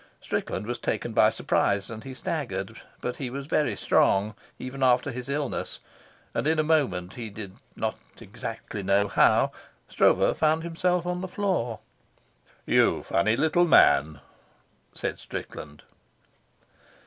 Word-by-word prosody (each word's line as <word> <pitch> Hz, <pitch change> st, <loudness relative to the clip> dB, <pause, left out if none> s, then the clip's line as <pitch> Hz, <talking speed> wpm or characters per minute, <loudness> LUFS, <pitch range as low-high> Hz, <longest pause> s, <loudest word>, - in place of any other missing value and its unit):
Strickland 95 Hz, -, -3 dB
was 120 Hz, +2 st, -4 dB
taken -, -, -2 dB
by -, -, +5 dB
surprise 100 Hz, +1 st, 0 dB
and 110 Hz, -1 st, -7 dB
he 130 Hz, -1 st, -8 dB
staggered, 115 Hz, -, -4 dB, 0.2 s
but 125 Hz, -, -3 dB
he 130 Hz, -3 st, -4 dB
was 135 Hz, +2 st, -5 dB
very 145 Hz, -6 st, +1 dB
strong, 100 Hz, +2 st, +2 dB, 0.2 s
even 130 Hz, +2 st, -7 dB
after 125 Hz, +2 st, +3 dB
his 125 Hz, +1 st, -7 dB
illness, 140 Hz, -1 st, -3 dB, 0.5 s
and -, -, -1 dB
in 160 Hz, 0 st, +2 dB
a 155 Hz, -, +3 dB
moment, 125 Hz, -, +1 dB
he 115 Hz, -3 st, -6 dB
did 100 Hz, -2 st, -8 dB, 0.2 s
not -, -, -3 dB, 0.2 s
exactly 105 Hz, -, -7 dB
know 100 Hz, +1 st, +2 dB
how, -, -, +4 dB, 0.4 s
Stroeve -, -, +3 dB
found 155 Hz, +1 st, +2 dB
himself 175 Hz, +1 st, 0 dB
on 180 Hz, 0 st, -2 dB
the 185 Hz, -, -4 dB
floor. 180 Hz, -, -1 dB, 0.8 s
"You -, -, +3 dB
funny 110 Hz, +4 st, +1 dB
little 160 Hz, +4 st, +3 dB
man," 75 Hz, -, +5 dB, 0.7 s
said -, -, -3 dB
Strickland. 75 Hz, -1 st, -8 dB
125 Hz, 135 wpm, -26 LUFS, 100-155 Hz, 0.8 s, by